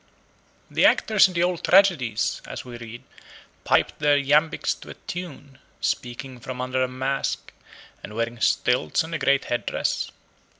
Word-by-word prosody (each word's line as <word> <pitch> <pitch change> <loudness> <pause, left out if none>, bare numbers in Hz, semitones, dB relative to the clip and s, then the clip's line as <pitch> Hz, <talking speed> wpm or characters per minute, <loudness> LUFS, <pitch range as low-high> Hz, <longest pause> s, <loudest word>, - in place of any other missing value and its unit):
The - - +1
actors 215 -3 +5
in 185 - -9
the 170 - +2
old 180 -1 -1
tragedies, 170 - +3
as - - -7
we 125 -1 -9
read, 115 0 -9 0.6
piped - - +2
their 145 -1 +4
iambics 150 +3 +2
to - - -11
a - - -7
tune, 145 -6 -8 0.2
speaking 125 +1 -3
from 125 +2 -7
under 130 +1 -1
a 130 - +2
mask, 130 +2 -3 0.5
and 105 - -9
wearing 115 0 -3
stilts 80 - +2
and 165 +1 -8
a 165 - -2
great 140 0 +2
head 120 - -2
dress. - - -1
135 Hz, 160 wpm, -24 LUFS, 120-160 Hz, 0.6 s, actors